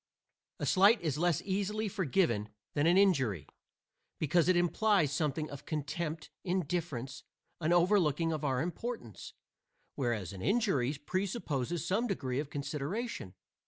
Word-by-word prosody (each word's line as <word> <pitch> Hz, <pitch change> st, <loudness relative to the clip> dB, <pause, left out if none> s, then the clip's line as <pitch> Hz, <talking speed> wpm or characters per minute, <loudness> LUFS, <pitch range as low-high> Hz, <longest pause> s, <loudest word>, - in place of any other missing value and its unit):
A -, -, -3 dB
slight 205 Hz, +4 st, +5 dB
is 155 Hz, -4 st, -1 dB
less 175 Hz, -3 st, +2 dB
easily 205 Hz, +3 st, -1 dB
forgiven 165 Hz, -, +1 dB, 0.2 s
than 145 Hz, +2 st, +2 dB
an 175 Hz, +2 st, +5 dB
injury, 130 Hz, -, +3 dB, 0.7 s
because 165 Hz, +1 st, +2 dB
it 185 Hz, -, +4 dB
implies 175 Hz, -2 st, +3 dB
something 150 Hz, +1 st, -1 dB
of 140 Hz, 0 st, -9 dB
contempt, 155 Hz, +1 st, -3 dB
indifference, 175 Hz, -8 st, -2 dB, 0.4 s
an 165 Hz, 0 st, 0 dB
overlooking 170 Hz, -3 st, +3 dB
of 155 Hz, -1 st, -4 dB
our 130 Hz, -3 st, +1 dB
importance; 180 Hz, -, -6 dB, 0.6 s
whereas 115 Hz, -, -2 dB
an 95 Hz, -, -8 dB
injury 195 Hz, -, +2 dB
presupposes 175 Hz, -, -2 dB
some 210 Hz, +7 st, +1 dB
degree 135 Hz, -, -2 dB
of 145 Hz, -1 st, -3 dB
consideration. 145 Hz, -, -4 dB
165 Hz, 125 wpm, -32 LUFS, 140-190 Hz, 0.7 s, slight